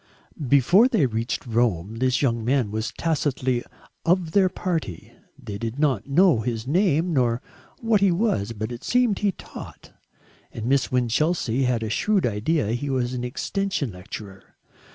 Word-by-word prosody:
Before 155 - +5
they 225 - +2
reached 115 +1 -2
Rome 110 -4 0
this 130 +2 +1
young 115 -4 +1
man 125 -3 +1
was 110 +2 -2
tacitly 135 -6 0 0.4
of 175 -1 +1
their 190 0 +4
party. 165 - -4 0.2
They 100 -1 -7
did 115 +2 -4
not 140 -8 +1
know 170 -2 +4
his 115 0 -3
name 170 +2 +2
nor 120 -4 +2 0.4
what 225 -3 +2
he 200 -2 +4
was, 170 - 0
but 110 +1 -4
it 120 - -7
seemed 245 -5 +2
he 205 -1 +2
taught, - - -11 0.6
and 110 - -6
Miss 135 +2 +1
Winchelsea 125 +1 +1
had 120 -2 0
a 110 - -3
shrewd 205 - +1
idea 115 +3 0
he 120 +5 -2
was 130 -2 -1
an 125 -1 -3
extension 185 - -2
lecturer. 95 +1 -10
130 Hz, 155 wpm, -24 LUFS, 115-170 Hz, 0.6 s, Before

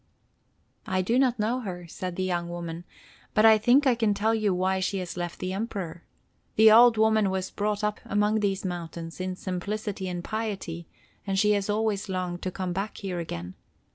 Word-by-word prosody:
"I 185 0 0
do 235 +7 +2
not 255 -3 +3
know 225 +4 0
her," 180 -7 -6
said 180 +2 -5
the 185 - -1
young 175 -2 -1
woman, 170 0 -6 0.5
"but 215 - +5
I 220 -1 +7
think 250 +7 +4
I 260 - +5
can 225 -3 +1
tell 220 +3 +1
you 215 -3 +1
why 185 +1 +1
she 190 +2 -1
has 180 -2 -5
left 175 -1 -4
the 185 0 -3
Emperor. 190 -6 -4 0.5
The 220 0 +7
old 235 +1 +7
woman 220 -2 +3
was 190 0 -2
brought 210 0 -1
up 210 0 0
among 210 +2 +1
these 195 -2 -1
mountains 170 -1 -5
in 185 0 -3
simplicity 190 +1 -4
and 175 -1 -4
piety, 195 -7 -4 0.4
and 195 0 0
she 210 +1 +4
has 205 -1 0
always 210 -1 0
longed 180 -2 -3
to 185 - -2
come 185 -1 -3
back 195 +4 -3
here 185 -3 -4
again. 90 - -5
195 Hz, 195 wpm, -27 LUFS, 180-215 Hz, 0.5 s, I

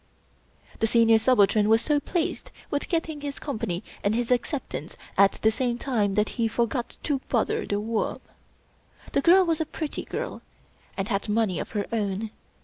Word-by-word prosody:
The 225 - +2
Senior 225 -1 +5
Subaltern 215 -3 +4
was 225 +1 +4
so 295 -1 +2
pleased 335 +2 -2 0.2
with 285 - -2
getting 325 -3 -1
his 285 -1 -4
Company 220 - -3 0.2
and 205 +2 +2
his 240 +1 -1
acceptance 245 - -2 0.2
at 195 0 +5
the 220 - +2
same 240 +1 -1
time 215 -7 0
that 210 0 +2
he 225 - +3
for 230 +1 +1
got 240 +1 -4
to 285 -3 0
bother 235 -4 0
The 205 - 0
Worm. 220 +1 -1 0.9
The - - +2
girl 365 +5 +6
was 325 -2 +1
a - - 0
pretty 310 -1 -4
girl, - - -4 0.6
and 195 +1 -2
had 200 0 -1
money 210 -4 +1
of - - -6
her 205 -2 -1
own. 210 -1 -1
230 Hz, 175 wpm, -26 LUFS, 210-280 Hz, 0.9 s, girl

